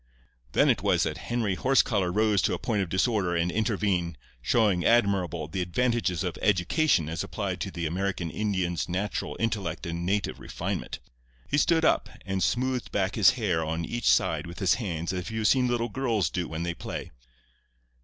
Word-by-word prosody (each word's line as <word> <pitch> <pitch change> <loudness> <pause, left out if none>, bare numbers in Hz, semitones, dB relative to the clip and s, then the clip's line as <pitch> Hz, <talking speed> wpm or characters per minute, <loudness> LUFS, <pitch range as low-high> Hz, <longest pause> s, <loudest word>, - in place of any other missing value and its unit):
"Then - - +4
it - - +3
was - - +2
that - - -3
Henry 115 -5 0
Horsecollar 105 -7 +2
rose 105 0 +2
to - - +1
a - - -4
point 105 -4 -1
of 95 - -3
disorder 95 -1 +1
and 85 +1 +1
intervened, 100 - 0 0.2
showing, 100 - +2
admirable, 95 -9 +2
the 95 +3 -3
advantages 105 -1 0
of - - -4
education 95 - +2
as 80 +1 -3
applied - - -3
to - - -2
the 85 -1 -4
American 90 0 -2
Indian's 95 -6 -1
natural 95 +4 -3
intellect 105 -8 -2
and 85 0 -3
native 100 +3 -1
refinement. - - -4 0.5
He 145 - +2
stood 160 +1 +3
up - - +2 0.2
and 95 -1 -2
smoothed 130 +4 0
back 95 0 0
his - - +6
hair 90 -8 0
on 80 +1 -2
each 120 - 0
side 75 +6 +2
with 85 - -9
his 95 - +3
hands 85 -4 -3
as 90 -1 -4
you 110 - -5
have 105 - +3
seen 130 +3 +4
little 120 -1 0
girls 115 - 0
do 90 -1 -2
when 80 +1 -4
they 85 0 -2
play. - - -6
95 Hz, 185 wpm, -27 LUFS, 85-110 Hz, 0.5 s, his